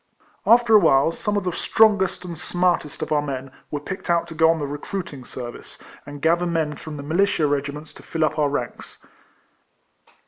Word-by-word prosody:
After 235 -1 +5
awhile, 165 -7 +5
some 210 +4 -2
of 205 - -1
the 180 - -1
strongest 205 -1 +2
and 175 -1 -6
smartest 175 -2 -1
of - - -6
our 150 -1 +3
men 135 -2 -5 0.2
were 145 - -3
picked 190 +6 -7
out 170 -1 +2
to - - -7
go 160 0 +4
on 165 - +3
the 150 - -3
recruiting 145 0 -6
service, 120 -1 -8 0.3
and 145 -1 -9
gather 170 +2 +3
men 160 -3 -1
from 155 0 -8
the 140 - -7
militia 165 +1 +1
regiments 145 +1 -3
to - - -14
fill 160 -1 -1
up 155 - -2
our 145 -1 +3
ranks. 125 -4 -5
160 Hz, 185 wpm, -23 LUFS, 145-180 Hz, 0.3 s, After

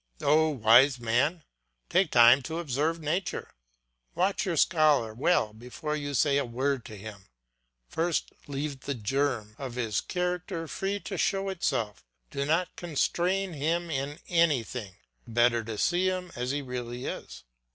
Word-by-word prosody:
Oh, 155 +2 +4
wise 130 +1 +5
man, 130 +9 +1 0.4
take 185 -4 +2
time 120 +2 +7
to 160 - -3
observe 160 +1 -1
nature; 165 +5 -2 0.6
watch 195 +3 +1
your 170 -3 -1
scholar 150 -9 +3
well 115 -3 +1
before 125 +7 -5
you 145 -1 -3
say 140 0 +3
a - - 0
word 130 +2 -1
to 110 -4 -9
him; 100 -1 -10 0.6
first 165 - -1 0.2
leave 140 0 -4
the 140 +1 -4
germ 120 -2 -1
of 130 -3 -6
his 115 -4 -1
character 180 -1 -3
free 195 +5 -2
to - - -5
show 195 0 +1
itself, 120 - -2 0.3
do 140 - -2
not 165 +4 0
constrain 180 +3 0
him 165 +3 -1
in 140 +1 -3
anything, 130 - +1 0.3
the 115 - -11
better 120 0 +3
to 110 -1 -5
see 180 - +2
him 185 -1 -2
as 125 +1 -3
he 145 +1 -1
really 125 -1 -5
is. - - -6
145 Hz, 150 wpm, -28 LUFS, 120-170 Hz, 0.6 s, time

